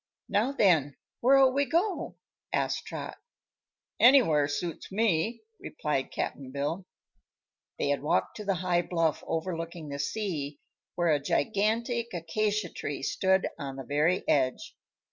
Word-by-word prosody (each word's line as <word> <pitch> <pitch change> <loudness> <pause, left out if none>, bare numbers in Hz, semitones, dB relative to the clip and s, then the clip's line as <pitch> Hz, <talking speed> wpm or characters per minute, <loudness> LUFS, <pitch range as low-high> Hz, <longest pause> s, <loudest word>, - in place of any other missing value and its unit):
"Now, 225 +6 +1
then, 165 - +3 0.2
where'll 265 +1 +5
we 280 +1 +2
go?" 355 +6 -1 0.4
asked - - -1
Trot. - - -6 0.8
"Anywhere 225 - +6
suits 160 +5 -4
me," 220 +2 +1 0.2
replied 145 -3 -2
Cap'n 135 -2 -4
Bill. 145 +7 -3 0.9
They - - 0
had 145 - +1
walked 150 - 0
to 210 - -6
the 195 -2 0
high 175 -1 +3
bluff 165 -3 0
overlooking 165 -1 -4
the 140 0 -5
sea, 150 -4 -3 0.4
where 175 -2 +2
a 150 - +3
gigantic 225 - 0
acacia 205 +4 -1
tree 145 -3 -5
stood 190 +5 +2
on 135 -1 -5
the 135 - -6
very 150 +7 +1
edge. 130 -3 +1
175 Hz, 130 wpm, -29 LUFS, 145-215 Hz, 0.9 s, Anywhere